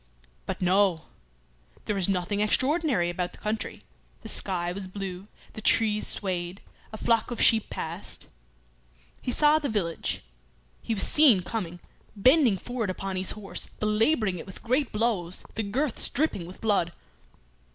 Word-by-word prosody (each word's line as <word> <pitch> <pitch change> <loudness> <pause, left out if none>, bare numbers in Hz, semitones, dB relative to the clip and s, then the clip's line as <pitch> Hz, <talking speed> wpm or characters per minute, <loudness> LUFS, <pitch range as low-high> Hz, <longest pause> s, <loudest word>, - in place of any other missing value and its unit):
But - - -3
no! 185 -2 +3 0.8
There 210 - 0
was 195 -2 +1
nothing 195 +2 0
extraordinary 255 - +2
about 175 0 -3
the - - -13
country; 215 +1 -3 0.4
the - - -7
sky 175 -3 0
was 190 +1 -5
blue, 190 0 -6 0.3
the 220 - -8
trees 215 -1 +3
swayed; 180 -1 -2 0.3
a 220 - -6
flock 230 0 +2
of 240 - -4
sheep 220 -2 +5
passed. - - -6 1.0
He - - -4
saw 300 +4 +5
the 290 - -2
village; 175 - -1 0.6
he 225 - -2
was 195 - +2
seen 260 -12 +5
coming 180 -5 -4 0.4
bending 250 0 +5
forward 240 -1 -3
upon 190 +1 -3
his 185 0 +1
horse, 210 -2 -6
belabouring 215 - +2
it - - -9
with 190 - -10
great 255 +5 +1
blows, 210 -6 -1
the 225 - -2
girths 240 +6 -2
dripping 250 - 0
with 185 - -12
blood. 200 -6 +1
205 Hz, 150 wpm, -27 LUFS, 185-230 Hz, 1.0 s, sheep